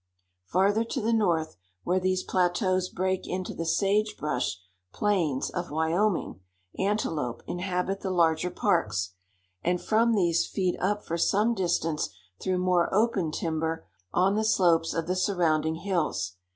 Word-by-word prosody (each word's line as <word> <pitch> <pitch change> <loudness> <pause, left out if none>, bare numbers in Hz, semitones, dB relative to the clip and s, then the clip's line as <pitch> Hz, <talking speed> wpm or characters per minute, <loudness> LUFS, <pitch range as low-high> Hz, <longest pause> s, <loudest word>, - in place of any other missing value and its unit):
Farther 200 +5 +2
to 230 +4 -3
the 230 0 0
north, 170 - +1 0.3
where 180 +2 +1
these 185 0 0
plateaus 185 0 +1
break 185 0 -1
into 185 0 -3
the 165 - -4
sage 210 +4 +1
brush 125 - -1 0.3
plains 175 -10 0
of 175 0 -4
Wyoming, 165 - 0 0.4
antelope 160 - -1
inhabit 180 +2 -2
the 190 - -3
larger 170 -1 +2
parks, 95 - 0 0.5
and 175 +1 +1
from 225 +3 +2
these 170 -4 +2
feed 185 -2 -1
up 205 +2 -1
for 170 +1 -3
some 210 +7 +3
distance 170 -6 0 0.3
through 185 -1 0
more 180 -1 +2
open 200 -5 +2
timber 160 0 -2 0.3
on 185 - +3
the 215 +1 +1
slopes 170 -6 +3
of 165 - -1
the 185 - -1
surrounding 160 -5 +1
hills. 165 - -1
180 Hz, 140 wpm, -27 LUFS, 165-195 Hz, 0.5 s, some